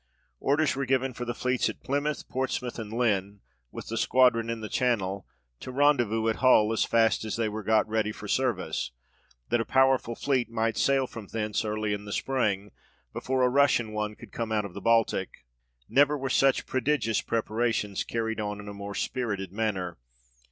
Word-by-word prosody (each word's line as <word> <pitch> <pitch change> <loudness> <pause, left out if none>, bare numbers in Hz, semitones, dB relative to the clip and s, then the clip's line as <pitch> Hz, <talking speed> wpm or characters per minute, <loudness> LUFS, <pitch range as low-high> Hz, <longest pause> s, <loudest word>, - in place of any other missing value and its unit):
Orders 145 +1 +2
were 135 -1 -2
given 130 0 +1
for 120 +1 -5
the 120 - -3
fleets 125 0 0
at - - -9
Plymouth, 145 +2 -2
Ports 130 0 -1
mouth, 125 -1 -6
and 110 -2 -6
Lynn, 105 -4 0 0.3
with - - -7
the 115 - -3
squadron 115 -1 +3
in 115 -1 -2
the 110 - -4
Channel, 100 -6 -1 0.3
to - - -7
rendezvous 120 -5 +2
at 110 - +1
Hull, 115 -4 +5
as 115 - +2
fast 115 -1 +2
as 110 - -3
they 115 -1 0
were 110 +1 -4
got 110 +1 +2
ready 110 -1 0
for 105 0 -9
service, 95 - -1 0.6
that 120 0 +2
a - - 0
powerful 130 -2 +2
fleet 130 -3 0
might 115 -1 0
sail 135 -1 +2
from 115 -4 -9
thence 105 -1 -2
early 105 -1 -1
in 105 0 -5
the 100 - -7
spring, 105 -6 -1 0.4
before 130 0 0
a - - +5
Russian 125 -4 +3
one 105 0 -3
could 115 -1 -13
come 115 -1 -4
out 105 -2 +1
of 95 - -8
the 100 - -7
Baltic. 115 - +1 0.4
Never 145 +2 +4
were 135 -1 -3
such 135 0 +3
prodigious 130 -4 0
preparations 110 -2 -1
carryed 115 -1 -2
on 105 -1 -3
in 105 - -9
a 100 - -6
more 100 0 -7
spirited 100 -8 -2
manner. 95 - -2
115 Hz, 190 wpm, -28 LUFS, 105-130 Hz, 0.6 s, Hull